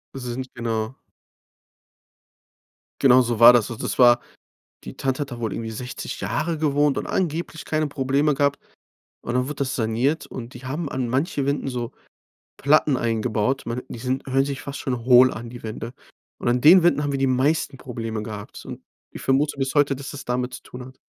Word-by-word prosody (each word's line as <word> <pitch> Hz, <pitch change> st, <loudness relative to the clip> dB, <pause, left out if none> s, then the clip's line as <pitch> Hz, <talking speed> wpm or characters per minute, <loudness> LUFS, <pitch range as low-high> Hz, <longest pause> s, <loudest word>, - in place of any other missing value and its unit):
Sind 125 Hz, 0 st, -4 dB
genau. 115 Hz, -1 st, -2 dB, 2.1 s
Genau 130 Hz, -1 st, +7 dB
so 120 Hz, -2 st, -1 dB
war 120 Hz, +1 st, +10 dB
das. 120 Hz, -2 st, +3 dB
Und 115 Hz, -, -6 dB
das -, -, -3 dB
war 120 Hz, -1 st, +7 dB, 0.7 s
die -, -, -9 dB
Tante 135 Hz, +1 st, -1 dB
hat 140 Hz, -, -5 dB
da 120 Hz, -1 st, -7 dB
wohl 110 Hz, -4 st, -2 dB
irgendwie 115 Hz, -1 st, -4 dB
60 125 Hz, +3 st, -6 dB
Jahre 165 Hz, -1 st, -2 dB
gewohnt 145 Hz, -2 st, +2 dB
und -, -, -4 dB
angeblich 165 Hz, -2 st, -2 dB
keine 155 Hz, -1 st, 0 dB
Probleme 140 Hz, +1 st, +1 dB
gehabt. 140 Hz, +1 st, +1 dB, 0.6 s
Und 120 Hz, -, -4 dB
dann 125 Hz, 0 st, +2 dB
wurde 145 Hz, +1 st, -6 dB
das 135 Hz, -2 st, -2 dB
saniert. 120 Hz, +7 st, 0 dB
Und 120 Hz, 0 st, -8 dB
die 125 Hz, +2 st, -11 dB
haben 150 Hz, +4 st, -3 dB
an 130 Hz, -2 st, -2 dB
manche 140 Hz, +2 st, -1 dB
Wänden 140 Hz, -1 st, -1 dB
so 120 Hz, -2 st, -4 dB, 0.7 s
Platten 145 Hz, -1 st, +3 dB
eingebaut. 115 Hz, +2 st, 0 dB
Man 120 Hz, +2 st, -3 dB
die 120 Hz, -, -7 dB
sind 130 Hz, +2 st, -3 dB
hören 135 Hz, +1 st, +2 dB
sich 140 Hz, 0 st, -4 dB
fast 140 Hz, 0 st, -7 dB
schon 125 Hz, -4 st, -3 dB
hohl 125 Hz, 0 st, +7 dB
an, 115 Hz, +1 st, -7 dB
die 120 Hz, 0 st, -10 dB
Wände. 115 Hz, +1 st, -6 dB, 0.5 s
Und -, -, -2 dB
an 125 Hz, +1 st, +2 dB
den 170 Hz, +5 st, +8 dB
Wänden 170 Hz, -4 st, +3 dB
haben 145 Hz, -1 st, -1 dB
wir 135 Hz, -, -1 dB
die 135 Hz, -, +2 dB
meisten 135 Hz, +2 st, +1 dB
Probleme 115 Hz, -4 st, -5 dB
gehabt. 105 Hz, -2 st, -8 dB
Und -, -, -8 dB, 0.3 s
ich -, -, -9 dB
vermute 140 Hz, +2 st, +1 dB
bis 135 Hz, +1 st, -1 dB
heute, 145 Hz, -2 st, +3 dB
dass 135 Hz, 0 st, -7 dB
das 145 Hz, -, -8 dB
damit 125 Hz, +1 st, -2 dB
zu -, -, -9 dB
tun 125 Hz, 0 st, -10 dB
hat. 130 Hz, 0 st, -14 dB
130 Hz, 195 wpm, -23 LUFS, 120-140 Hz, 2.1 s, war